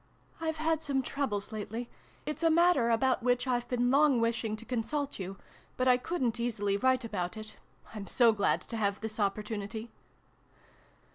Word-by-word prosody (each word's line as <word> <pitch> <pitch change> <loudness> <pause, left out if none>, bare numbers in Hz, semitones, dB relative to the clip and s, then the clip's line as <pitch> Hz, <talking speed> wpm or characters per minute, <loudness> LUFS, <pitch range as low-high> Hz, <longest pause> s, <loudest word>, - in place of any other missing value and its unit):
" - - -28
I've 320 -1 -1
had 320 0 +1
some 275 -4 0
troubles 230 -8 -2
lately. 220 +3 -4 0.4
It's 305 +1 -4
a 330 - +4
matter 330 -7 +4
about 255 +3 +2
which 245 +1 +2
I've 245 -2 0
been 245 0 +1
long 280 -2 +5
wishing 230 -1 0
to 225 +2 -10
consult 255 +4 -2
you, 190 +1 -5 0.4
but 255 - +1
I 250 -1 +6
couldn't 250 -5 -1
easily 210 -4 0
write 260 +3 +2
about 190 -2 -3
it. 215 0 -7 0.4
I'm 205 -3 -6
so 235 +4 +5
glad 210 -2 +1
to 230 - -5
have 200 -2 0
this 220 0 -5
opportunity 210 +2 -2
235 Hz, 170 wpm, -31 LUFS, 215-265 Hz, 0.4 s, I